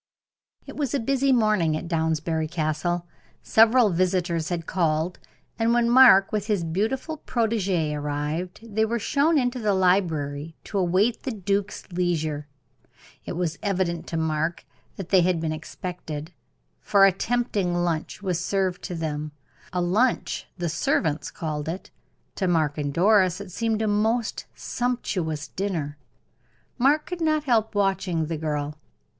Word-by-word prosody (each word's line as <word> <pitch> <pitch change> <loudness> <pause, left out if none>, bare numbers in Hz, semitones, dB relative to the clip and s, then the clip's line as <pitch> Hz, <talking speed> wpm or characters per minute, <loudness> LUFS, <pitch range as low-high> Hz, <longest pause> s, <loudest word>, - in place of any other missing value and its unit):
It - - -9
was 285 -3 -1
a - - +1
busy 275 +3 +1
morning 210 -10 +3
at 170 - -6
Downsbury 160 -1 0
Castle. 165 +2 -1 0.4
Several 225 0 +5
visitors 175 -2 0
had 170 -2 -3
called, 165 0 0 0.4
and 230 +1 +3
when 240 -1 +3
Mark, 240 -7 +7
with 210 -1 -2
his 205 -6 +1
beautiful 220 - -2
protegee, 200 - 0
arrived, 150 +5 -3
they 220 -1 0
were 230 +2 0
shown 290 +8 +2
into 250 -1 0
the 210 -3 +1
library 165 -5 +1
to 200 - -2
await 190 +6 +2
the - - -4
duke's 200 -2 -2
leisure. 160 -4 -1 0.8
It - - -4
was 170 -2 -2
evident 185 -4 -1
to 165 - -3
Mark 160 +1 -1 0.3
that 190 -3 -7
they 190 -2 +5
had 175 -1 +2
been 160 -1 -2
expected, 160 0 -6 0.5
for 200 -1 +5
a 195 - +6
tempting 205 -3 -1
lunch 175 +2 -2
was 180 -2 -1
served 190 -2 0
to 180 - -4
them; 155 -2 -3 0.4
a 180 - -1
lunch 210 +9 +1
the 175 - -2
servants 155 -1 0
called 155 -1 -4
it 180 +4 -6 0.5
to 190 - 0
Mark 155 -4 +1
and 145 -1 -1
Doris 185 +2 +3
it 200 -2 -8
seemed 225 +2 -1
a - - +1
most 220 +3 0
sumptuous 185 -11 -2
dinner. 160 -7 -3 0.8
Mark 290 +5 +3
could 360 -1 -6
not 310 -2 +2
help 225 -6 +1
watching 190 -5 +1
the 165 +1 -3
girl. 150 -1 -3
180 Hz, 150 wpm, -25 LUFS, 160-220 Hz, 0.8 s, Mark